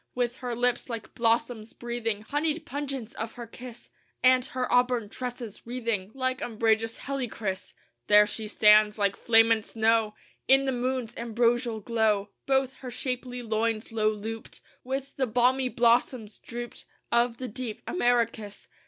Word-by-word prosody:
With 245 0 -1
her 245 -2 -4
lips, 245 +1 0
like 230 -2 -6
blossoms, 230 -1 0
breathing 230 -3 -3
Honeyed 305 +5 -1
pungence 270 -5 -4
of 225 +1 -5
her 240 - -8
kiss, 240 +1 -11 0.3
And 255 0 +6
her 255 -1 -2
auburn 245 -3 +2
tresses 245 -3 -6
wreathing 230 -6 -2
Like 260 -1 -1
umbrageous 225 0 0
helichrys, 230 -8 -4 0.3
There 210 0 +7
she 215 +1 -4
stands, 210 0 +5
like 200 -1 +1
flame 225 0 +4
and 220 -1 +3
snow, 220 -1 +1 0.3
In 270 +1 +5
the 265 - +1
moon's 250 -2 -2
ambrosial 235 0 0
glow, 215 -3 +1 0.2
Both 265 -1 +1
her 255 - -8
shapely 250 0 -4
loins 220 0 -1
low 215 -1 +2
looped 220 +2 -6 0.2
With 270 +2 -4
the 260 -2 +1
balmy 250 +3 +2
blossoms, 235 -2 +1
drooped, 240 0 -7 0.3
Of 235 0 +2
the 255 - -5
deep 235 -1 -6
amaracus. 235 - 0
235 Hz, 145 wpm, -27 LUFS, 220-250 Hz, 0.3 s, There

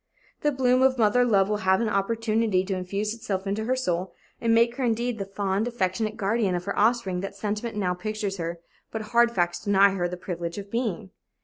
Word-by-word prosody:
The 295 - +2
bloom 255 -2 +2
of 260 0 +4
mother 230 +2 +4
love 200 -5 +3
will 210 0 0
have 190 -2 +2
an 230 - 0
opportunity 215 -1 +1
to 195 0 -2
infuse 200 +4 -2
itself 205 -4 -4
into 205 +2 -2
her 255 +2 +1
soul 185 -7 -2 0.3
and 230 - +2
make 235 +2 +3
her, 270 - -1
indeed, 235 0 0
the 195 - -2
fond, 195 +2 -1
affectionate 215 -1 -1
guardian 205 -2 +1
of 175 - -3
her 200 - -2
offspring 210 -4 +2
that 195 +1 -5
sentiment 210 +2 -3
now 185 -3 0
pictures 210 +1 -3
her 170 0 -4 0.3
but 220 -1 -4
hard 235 0 +6
facts 175 -6 0
deny 200 0 +5
her 180 -2 -1
the 180 - -5
privilege 170 -1 -5
of 200 0 -7
being. 225 - -2
210 Hz, 210 wpm, -26 LUFS, 190-230 Hz, 0.3 s, hard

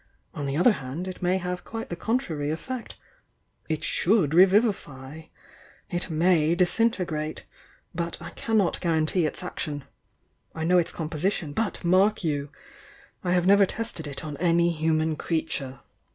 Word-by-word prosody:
On 145 - -4
the 140 +1 -1
other 180 +8 +6
hand 145 +2 -5
it 185 - -7
may 180 +1 +2
have 180 -1 -4
quite 225 0 -6
the 175 - -3
contrary 170 - -1
effect. 235 +10 -5 0.7
It 155 -1 -1
should 180 -6 +2
re 180 +3 +9
vivify 160 - -1 0.3
— - - -26
it 175 - 0
may 165 0 +3
disintegrate, 180 -5 0 0.2
— - - -32
but 170 0 -3
I - - -8
cannot 215 -6 0
guarantee 165 0 +1
its 170 - -5
action. 150 -5 -4 0.7
I 160 - -3
know 180 +2 +4
its 170 - -1
com 160 - -4
position, 160 -1 -1
but, 220 0 -2
mark 190 +4 +3
you! 145 -3 -1 0.4
— - - -25
I 180 - +1
have 180 -1 +2
never 200 +1 +6
tested 225 -9 -4
it 140 +1 -5
on 150 -2 -5
any 170 +1 +3
human 160 -1 0
creature. 145 -6 -3
170 Hz, 165 wpm, -26 LUFS, 155-185 Hz, 0.7 s, re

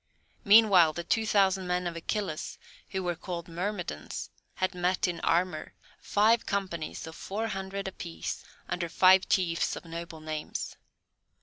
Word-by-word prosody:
Meanwhile 200 -6 +7
the 170 - -4
two 220 +5 +1
thousand 190 -2 +3
men 180 0 0
of 170 -1 -3
Achilles, 165 -1 -3 0.3
who 190 -1 -2
were 175 -1 0
called 170 0 -6
Myrmidons, 175 - -4 0.2
had 185 +1 0
met 180 +1 +1
in 175 -1 -3
armour, 170 -2 0 0.2
five 220 +3 +3
companies 185 -5 -3
of 160 0 -9
four 215 +7 -3
hundred 195 0 -4
apiece, 80 - -5 0.2
under 170 -1 -2
five 185 +2 +5
chiefs 170 -3 +1
of - - -9
noble 165 -1 -7
names. 155 -1 -4
180 Hz, 140 wpm, -29 LUFS, 165-195 Hz, 0.3 s, Meanwhile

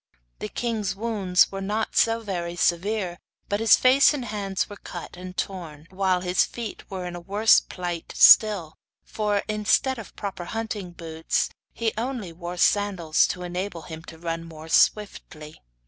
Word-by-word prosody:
The 105 - -5
king's 220 -5 -2
wounds 200 -4 +2
were 195 0 -5
not 210 +3 -2
very 195 -7 0
severe, 180 +1 0 0.3
but 205 - 0
his 225 -1 +6
face 270 +3 +5
and 260 -4 -4
hands 200 -3 -2
were 205 - -10
cut 175 -2 -9
and 180 +1 -9
torn, 165 -6 -5
while 190 -1 +1
his 180 0 +2
feet 235 -3 -7
were 185 -2 -5
in 175 0 -6
a - - -6
worse 205 +5 +4
plight 175 -2 -6
still, 200 -8 +6 0.3
for, 210 -2 -1
instead 215 +4 +1
of 220 - -11
proper 195 -4 -5
hunting 220 -3 -4
boots, 165 -2 -2 0.2
he 225 -2 -2
only 235 -8 -4
wore 175 +1 -7
sandals, 185 -5 +2
to 180 - -5
enable 180 -1 -4
him 160 -1 -8
to 160 - -11
run 165 0 -4
more 160 -1 -11
swiftly. 160 -6 0
190 Hz, 160 wpm, -25 LUFS, 175-215 Hz, 0.3 s, his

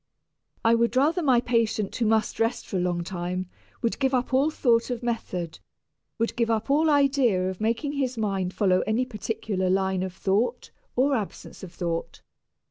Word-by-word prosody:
I 230 - +6
would 235 +1 +2
rather 305 +7 +3
my 260 -6 +4
patient 225 -4 0
who 230 - +1
must 220 0 +1
rest 225 +1 0
for 195 - -3
a - - +1
long 175 -1 0
time 180 0 -4 0.4
would 230 - 0
give 265 -1 +2
up 255 +1 -1
all 275 +4 +4
thought 235 -6 +2
of 245 -1 -3
method, 185 -8 -3 0.6
would 230 0 -1
give 235 -1 0
up 225 +3 0
all 310 +3 +4
idea 275 -10 +3
of 190 - -10
making 230 +6 0
his 265 -4 -2
mind 195 -4 -1
follow 185 -2 +2
any 225 +4 +1
particular 210 -4 -2
line 190 0 +1
of 185 -1 -4
thought 220 +7 0 0.2
or 275 +3 +3
absence 210 -5 -6
of 190 - -9
thought. 170 -1 -4
225 Hz, 180 wpm, -26 LUFS, 190-255 Hz, 0.6 s, I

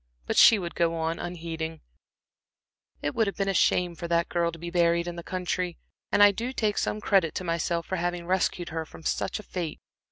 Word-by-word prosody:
But - - -2
she 225 - +8
would 175 -3 -5
go 165 -1 +1
on 165 0 -2
unheeding: 165 -2 -5 1.2
"It 145 - -1
would 225 -2 +2
have 200 - -2
been 195 - 0
a 195 - +1
shame 180 -1 +2
for 170 0 -6
that 170 0 +1
girl 170 -1 +1
to 165 - -10
be 170 +1 -6
buried 170 -1 +2
in 175 - -4
the 170 - -6
country, 180 0 -3 0.3
and 205 - +6
I 205 - +8
do 235 +5 -4
take 215 -5 0
some 210 - -1
credit 195 -6 +2
to - - -2
myself 170 0 -1
for 190 - -3
having 175 0 -2
rescued 180 -1 0
her 160 0 -3
from 160 - -14
such - - -1
a - - -9
fate. 175 -5 -5
175 Hz, 220 wpm, -27 LUFS, 170-185 Hz, 1.2 s, she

